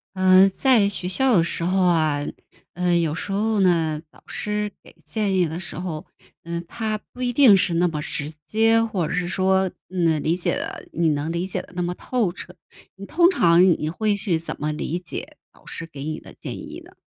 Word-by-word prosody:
嗯， 185 +1 +6
在 220 0 +3
学 190 -2 -3
校 245 +7 +3
的 165 - +4
时 170 - -3
候 185 +2 +1
啊， 155 -5 +2 0.5
嗯， 175 0 +2
有 160 -2 -1
时 190 - -5
候 215 +2 +1
呢， 165 -5 +2
老 - - -20
师 210 0 -3
给 - - -17
建 210 -3 -1
议 180 -2 +3
的 160 +2 -5
时 185 - -8
候， 175 -2 -5 0.4
嗯， 170 0 -4
他 215 +1 -3
不 250 +4 -9
一 245 -1 0
定 240 -6 +7
是 180 -2 0
那 175 +1 +3
么 160 -3 -3
直 150 -1 -5
接， 225 +5 +3
或 195 -8 -1
者 - - -4
是 180 -1 -1
说， 190 0 +1 0.2
嗯， 165 -4 +1
理 165 +3 0
解 180 - -1
得 - - -6
你 165 0 +2
能 150 +1 -1
理 170 +2 -2
解 190 - -3
得 - - -17
那 180 - -1
么 175 0 -2
透 230 -5 -1
彻。 180 0 -10 0.4
你 200 +1 -10
通 345 +2 +4
常 170 - +5
你 160 -4 +2
会 210 +5 0
去 190 -4 0
怎 160 - -5
么 150 +1 0
理 155 +3 -3
解 180 - -7 0.2
老 - - -24
师 165 - -7
给 145 -4 -9
你 155 +1 -4
的 - - -14
建 - - -6
议 - - -8
呢？ - - -17
180 Hz, 230 characters per minute, -23 LUFS, 165-205 Hz, 0.5 s, 定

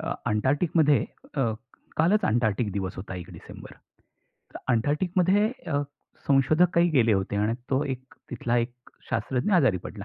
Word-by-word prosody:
अ, - - -3
अंटार्क्टिकमध्ये 145 +4 +2 0.3
अ, 135 - +2 0.5
कालच 180 +7 +3
अंटार्क्टिक 110 -1 +1
दिवस 95 -1 -3
होता 95 0 -7
1 90 -2 -8
डिसेंबर. - - -11 0.8
तर - - -6
अंटार्क्टिकमध्ये 180 - +2 0.2
अ, 145 -1 +1 0.5
संशोधक 155 +6 +4
काही 170 +1 +4
गेले 120 -7 +3
होते 95 0 -1
आणि 105 +2 +1 0.2
तो 135 +1 +2
एक 130 -2 -6 0.2
तिथला 120 0 -1
1 120 +1 -2 0.4
शास्त्रज्ञ 125 - -1
आजारी 130 - +4
पडला. 100 -2 -8
130 Hz, 145 wpm, -26 LUFS, 110-155 Hz, 0.8 s, संशोधक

